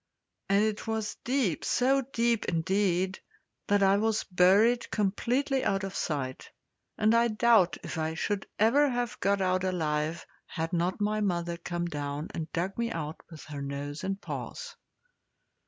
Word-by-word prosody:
And 200 +1 +4
it 215 +1 -3
was 220 -2 -2
deep 245 - 0
so 270 +2 +2
deep, 235 -3 0
indeed, 185 +2 0 0.5
that 205 0 +3
I 195 +1 +5
was 220 +1 +1
buried 200 +6 +4
completely 250 +7 0
out 195 -1 0
of 195 0 -5
sight; 135 -4 -3 0.5
and 215 +1 +3
I 235 0 +4
doubt 220 -4 +4
if 160 - -5
I 160 0 -1
should 205 +3 -2
ever 275 +7 +4
have 245 -2 -2
got 200 +1 +1
out 185 0 +1
alive 160 -3 -1 0.2
had 165 +2 -4
not 175 +4 0
my 215 +1 +1
mother 175 -3 -1
come 175 0 -4
down 145 -1 -4
and 160 -1 -5
dug 185 +5 -2
me 235 0 0
out 155 -5 -5
with 160 -3 -11
her 145 -2 -7
nose 140 +1 -5
and 195 +1 -2
paws. 485 - -6
195 Hz, 155 wpm, -29 LUFS, 170-225 Hz, 0.5 s, I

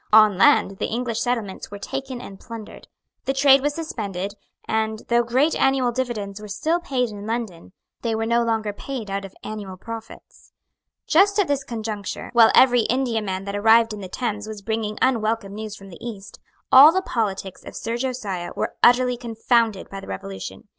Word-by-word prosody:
On 215 -2 +7
land 195 +1 +4
the - - 0
English 235 -1 -2
settlements 230 -6 -2
were 205 - -7
taken 265 +4 -5
and 195 -4 -10
plundered. 230 -3 -10 0.4
The 270 - 0
trade 275 0 +6
was 290 +1 -1
suspended; 200 - -4 0.3
and, 220 0 -1
though 235 0 +4
great 260 +7 +2
annual 265 -2 +2
dividends 220 -5 -3
were 210 - -8
still 310 - 0
paid 260 -7 -1
in 205 0 -8
London, 220 -8 -4 0.3
they 230 -2 -1
were 225 0 -1
no 235 +1 +2
longer 220 -2 -1
paid 225 -2 -6
out 195 0 -3
of 195 - -12
annual 205 -3 -6
profits. 225 +3 -10 0.5
Just 400 +5 +4
at 405 -4 +3
this 280 -1 0
conjuncture, 215 -4 -5
while 230 -2 +7
every 245 -3 +5
Indiaman 220 -7 -1
that 200 0 -4
arrived 225 +2 +4
in 210 - -7
the 185 - -7
Thames 215 -1 -3
was 215 -2 -8
bringing 220 -1 -2
unwelcome 225 -5 0
news 215 0 -6
from 195 -1 -13
the 175 - -13
East, 210 -5 -8 0.3
all 275 +4 +10
the 375 +2 0
politics 195 - -3
of - - -10
Sir 230 +1 -3
Josiah 230 -8 -3
were - - -2
utterly 250 0 +5
confounded 230 -3 0
by 195 - -6
the - - -11
Revolution. 95 0 -7
225 Hz, 180 wpm, -23 LUFS, 205-250 Hz, 0.5 s, all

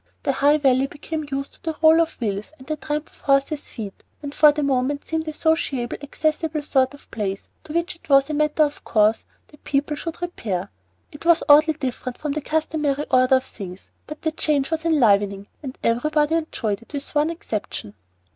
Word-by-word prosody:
The - - +2
High 285 +2 +4
Valley 270 -2 +3
became 300 +1 -5
used 275 0 -3
to - - -15
the 320 -2 -4
roll 320 +1 +6
of 330 - -2
wheels 210 +2 -3
and 260 - -14
the 310 - -2
tramp 300 0 -4
of - - -21
horses' 275 +2 +1
feet, 205 -4 -8 0.2
and 285 0 -5
for 300 0 +7
the 295 0 -2
moment 275 +1 0
seemed 320 0 -2
a - - -1
sociable, 300 -6 0
accessible 310 +1 -1
sort 265 -1 +1
of 285 - -20
place 200 -3 -4 0.2
to 305 - -7
which 340 +1 -1
it 330 - -23
was 275 -1 +6
a 305 - -4
matter 300 +1 +2
of 290 -1 -3
course 215 0 +2 0.2
that 295 - -20
people 290 +2 0
should 325 +2 -6
repair. 205 - -3 0.4
It 295 - -11
was 335 0 +4
oddly 305 +2 +7
different 255 -3 -4
from 300 -1 -3
the 305 +2 -2
customary 300 -2 -1
order 255 0 +5
of 260 - +1
things, 190 -6 -9 0.2
but 305 +1 -9
the 315 - +1
change 300 -2 0
was 320 0 -2
enlivening, 205 -10 +3 0.2
and 265 -3 -7
everybody 295 +6 +2
enjoyed 235 -10 -1
it 230 - -19
with 285 0 -5
one 295 +1 +2
exception. 215 - -5
290 Hz, 200 wpm, -23 LUFS, 255-310 Hz, 0.4 s, for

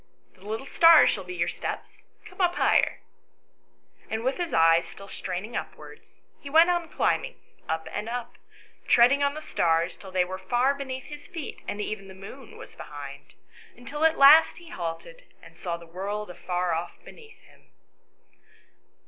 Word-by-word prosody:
" - - -39
The 185 - -23
little 220 +6 -5
stars 330 +1 +7
shall 195 - -4
be 180 0 -7
your 170 0 0
steps; - - -6 0.2
come - - -8
up 350 -1 +2
higher." - - +2 1.1
And 220 +1 -3
with 260 +2 0
his 350 -2 -3
eyes 165 +1 +4
still 195 - -12
straining 190 +5 -5
upwards, - - -9 0.2
he 280 - -9
went 325 +4 +6
on 345 -2 -1
climbing, - - 0 0.3
up 160 0 -2
and 210 +2 -4
up, 240 0 -6 0.5
treading 250 +4 +5
on 280 0 +1
the 310 - -7
stars 165 +1 +1
till 195 - -12
they 185 -1 +1
were 185 +1 -6
far 245 +8 +1
beneath 265 -2 -6
his 295 -1 -11
feet 330 -6 -7
and 205 - -4
even 210 -1 -4
the 190 - -12
moon 215 +6 -12
was - - -12
behind, 145 -2 -10 0.4
until 280 +6 -5
at 320 0 +4
last 295 +4 +7
he 345 -1 -13
halted 180 - -6 0.2
and - - -15
saw 170 -3 -4
the 170 - -14
world 195 +4 -5
afar 180 -1 -2
off 170 +2 -4
beneath 450 0 -15
him. - - -23
220 Hz, 175 wpm, -26 LUFS, 180-290 Hz, 1.1 s, stars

